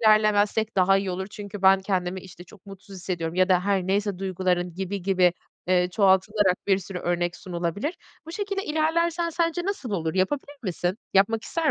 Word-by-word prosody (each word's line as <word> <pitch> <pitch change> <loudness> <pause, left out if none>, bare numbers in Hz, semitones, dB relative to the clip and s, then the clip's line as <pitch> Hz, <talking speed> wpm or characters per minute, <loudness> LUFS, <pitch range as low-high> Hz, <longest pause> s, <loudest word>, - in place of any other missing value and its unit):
ilerlemezsek 215 0 +3
daha 195 +1 +5
iyi 195 -1 -1
olur 190 +1 -3
çünkü 205 -1 -8
ben 190 0 +6
kendimi 190 -1 -2
işte 180 -1 -12
çok 200 +2 -18
mutsuz 195 0 -11
hissediyorum 170 -3 -4
ya 185 +1 +3
da 180 -1 +4
her 195 -2 +1
neyse 200 -1 0
duyguların 180 -2 -1
gibi 190 +1 -4
gibi, 185 -2 +3 0.3
eee, 180 0 +3
çoğaltılarak 190 0 +2
bir 195 -1 +3
sürü 190 -1 -6
örnek 175 0 -1
sunulabilir. 180 - -3 0.3
Bu 330 - -8
şekilde 395 +1 -3
ilerlersen 335 +2 0
sence 335 +1 0
nasıl 380 - -3
olur? 165 -5 -2
Yapabilir 275 +10 -1
misin? 185 +1 -2 0.2
Yapmak 215 +3 +3
ister 325 -3 0
195 Hz, 175 wpm, -25 LUFS, 180-220 Hz, 0.3 s, ben